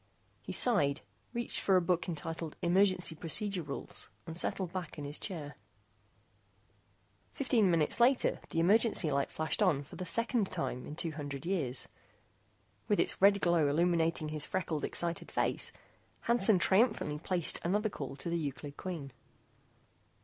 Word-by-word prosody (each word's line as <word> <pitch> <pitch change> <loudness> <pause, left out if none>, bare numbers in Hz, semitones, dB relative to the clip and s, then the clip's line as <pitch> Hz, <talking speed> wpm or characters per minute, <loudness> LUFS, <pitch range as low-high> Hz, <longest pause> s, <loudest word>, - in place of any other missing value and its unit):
He - - -7
sighed, 155 - +3 0.3
reached 235 -1 -2
for 195 - +2
a 185 - +5
book 180 0 0
entitled 165 0 -4
Emergency 185 -1 +3
Procedure 185 +4 -1
Rules, 145 -3 -6 0.2
and 165 - -7
settled 180 0 -1
back 185 -3 -5
in 145 - -5
his 145 +2 -1
chair. 155 -7 -6 1.8
Fifteen 240 -8 +2
minutes 165 +2 +2
later 245 +2 +3
the 165 - -1
emergency 200 -2 +3
light 140 0 0
flashed 160 +6 -2
on 160 -8 +3
for 140 - -12
the 185 - -5
second 230 +3 +1
time 160 -8 -3
in 150 - -7
two 165 0 -3
hundred 145 -2 -6
years. 155 -9 -1 1.0
With 205 - +2
its - - +1
red 200 0 +5
glow 170 -4 +3
illuminating 165 0 +1
his 155 -1 -3
freckled 165 -5 -3
excited 170 -1 -2
face, - - +2 0.5
Hansen 225 -4 +4
triumphantly 190 -5 +2
placed 175 0 0
another 210 +5 +1
call 140 -8 -6
to 170 - -6
the 170 - 0
Euclid 145 -1 -6
Queen. 160 -8 -6
170 Hz, 150 wpm, -32 LUFS, 150-195 Hz, 1.8 s, a